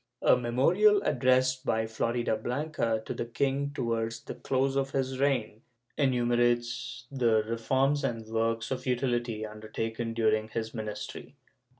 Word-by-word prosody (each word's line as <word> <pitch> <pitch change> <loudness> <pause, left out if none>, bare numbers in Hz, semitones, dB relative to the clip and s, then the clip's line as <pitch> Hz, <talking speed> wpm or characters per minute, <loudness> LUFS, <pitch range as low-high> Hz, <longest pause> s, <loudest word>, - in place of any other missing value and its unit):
A - - +6
memorial 165 - +4
addressed 130 -1 +2
by 110 -4 +1
Floridablanca 115 +2 -1
to - - -3
the - - -3
king, 140 +4 0
towards 115 -3 -2
the - - -6
close 135 +1 0
of 135 0 +1
his 130 -1 -1
reign, 125 -6 0 0.3
enumerates 120 -2 +1
the 115 -5 +2
reforms 130 +6 +1
and 115 -1 -2
works 115 +1 -1
of 130 0 -3
utility 120 -3 0
undertaken 115 +2 -4
during 110 -1 +2
his 110 0 -4
ministry. 105 -2 -6
120 Hz, 125 wpm, -29 LUFS, 115-130 Hz, 0.3 s, A